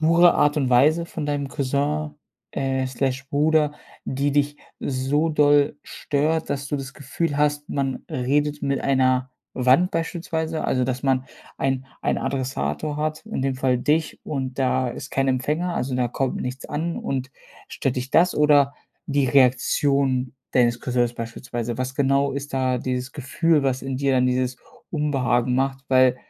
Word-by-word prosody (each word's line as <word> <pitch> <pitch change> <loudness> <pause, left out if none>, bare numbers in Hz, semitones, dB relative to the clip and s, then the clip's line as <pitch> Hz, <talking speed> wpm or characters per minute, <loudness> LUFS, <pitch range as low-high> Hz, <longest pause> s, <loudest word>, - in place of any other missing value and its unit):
pure 170 +2 +5
Art 145 +1 +3
und 135 -4 +1
Weise 155 +7 +4
von 160 -3 -5
deinem 145 -1 -2
Cousin, 145 +3 -1 0.4
äh, 130 -1 -1
slash 130 +1 -2
Bruder, 150 0 +3 0.3
die 140 +2 -1
dich 145 +1 +1 0.2
so 140 +4 0
doll 145 -1 +4
stört, 160 +2 -1
dass 140 0 -3
du 145 - -1
das 135 -1 -6
Gefühl 145 +2 -3
hast, 150 0 +1
man 135 -2 -2
redet 145 +3 0
mit 140 0 0
einer 130 -1 +2 0.2
Wand 130 +9 +4
beispielsweise, 165 -1 -2
also 130 -1 +1
dass 130 +1 -3
man 130 -1 +1 0.3
ein 135 -1 -1 0.2
ein - - +1
Adressator 130 - -2
hat, 155 +4 -2
in 220 -10 -3
dem 135 -1 0
Fall 130 -1 +1
dich 155 +4 0
und 135 -3 -4
da 130 -1 +1
ist 120 - -7
kein 135 0 +1
Empfänger, 150 +7 0
also 130 +1 -2
da 125 -1 +1
kommt 130 +2 -1
nichts 125 +1 -5
an 165 +3 -3
und 130 -1 -3 0.4
stört 130 -2 -2
dich 125 +1 -3
das 175 +3 +4
oder 145 -2 +4 0.3
die 140 -3 +1
Reaktion 130 0 +2 0.2
deines 120 -2 +3
Cousins 120 -2 0
beispielsweise? 115 0 -5
Was 130 +1 -3
genau 140 0 +2
ist 140 +1 -5
da 130 -1 +1
dieses 125 +1 -3
Gefühl, 150 +2 +1
was 130 -1 0
in 135 -1 -3
dir 140 -1 +1
dann 125 -1 +3
dieses 125 0 0 0.3
Unbehagen 130 -5 +1
macht, 135 +1 -1
weil 130 -1 +5
135 Hz, 160 wpm, -23 LUFS, 130-150 Hz, 0.4 s, pure